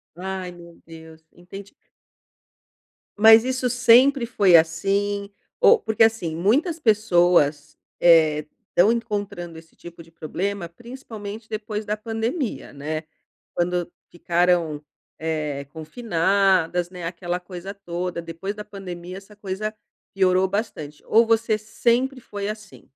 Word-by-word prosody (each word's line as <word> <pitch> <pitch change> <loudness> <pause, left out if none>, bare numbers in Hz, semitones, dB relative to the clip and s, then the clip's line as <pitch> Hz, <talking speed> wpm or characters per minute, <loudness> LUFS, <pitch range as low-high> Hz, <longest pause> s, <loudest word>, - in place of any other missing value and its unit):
Ai, 185 0 -5
meu 170 -1 -15
Deus. 160 -1 -13
Entendi. 195 +6 -12 1.4
Mas 220 +1 +8
isso 255 0 -1
sempre 250 +2 +5
foi 200 -7 +4
assim? 200 +5 +1 0.3
Ou 460 - +7
porque 220 0 +2
assim, 200 -8 +1
muitas 285 - +1
pessoas, 175 - +2 0.2
eh, 155 -3 +5 0.2
estão 195 +6 +4
encontrando 205 -7 -4
esse 160 0 -16
tipo 170 -1 -12
de 165 - -17
problema, 175 +3 -4
principalmente, 220 +1 -9
depois 215 0 -5
da 210 +1 -1
pandemia, 225 - -4
né. 155 +3 -4 0.5
Quando 175 0 -1 0.2
ficaram, 170 -3 0 0.3
eh, 150 -3 -3
confinadas, 180 0 +1
né, 180 -2 -8
aquela 175 +1 -4
coisa 180 +1 -8
toda. 180 -3 -5
Depois 170 +4 -6
da 210 0 -8
pandemia 185 -3 -8
essa 200 +2 -13
coisa 205 +2 -5 0.4
piorou 185 -1 +3
bastante, 175 -8 -5
ou 230 +1 +4
você 225 -1 +2
sempre 240 +4 0
foi 205 -2 -6
assim? 215 -2 -8
190 Hz, 120 wpm, -23 LUFS, 170-215 Hz, 1.4 s, Mas